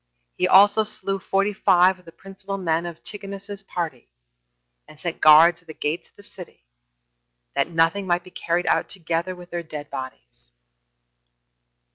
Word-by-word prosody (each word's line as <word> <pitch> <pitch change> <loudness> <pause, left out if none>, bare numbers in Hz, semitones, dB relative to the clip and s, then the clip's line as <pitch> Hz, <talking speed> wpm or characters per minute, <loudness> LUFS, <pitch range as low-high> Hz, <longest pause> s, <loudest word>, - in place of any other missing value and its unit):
He 180 - +1
also 205 +3 +6
slew 195 -2 -2
forty 195 +2 0
five 185 -1 +3
of 180 - -23
the 165 - -12
principal 195 +2 -8
men 170 -2 -1
of 170 - -7
Antigonus's 200 +1 -7
party, 165 -9 -5 0.8
and 150 - -16
set 170 0 -5
guards 165 +3 +7
at 175 - -32
the 160 - -10
gates 155 +4 -3
of - - -42
the 205 - -16
city, 180 - -13 0.9
that - - 0
nothing 165 +4 +1
might 175 0 +1
be 185 - -15
carried 175 0 -2
out - - +1
together 170 0 -3
with 180 0 -14
their 175 0 -3
dead 150 -3 -9
bodies. - - -9
175 Hz, 160 wpm, -23 LUFS, 165-195 Hz, 0.9 s, guards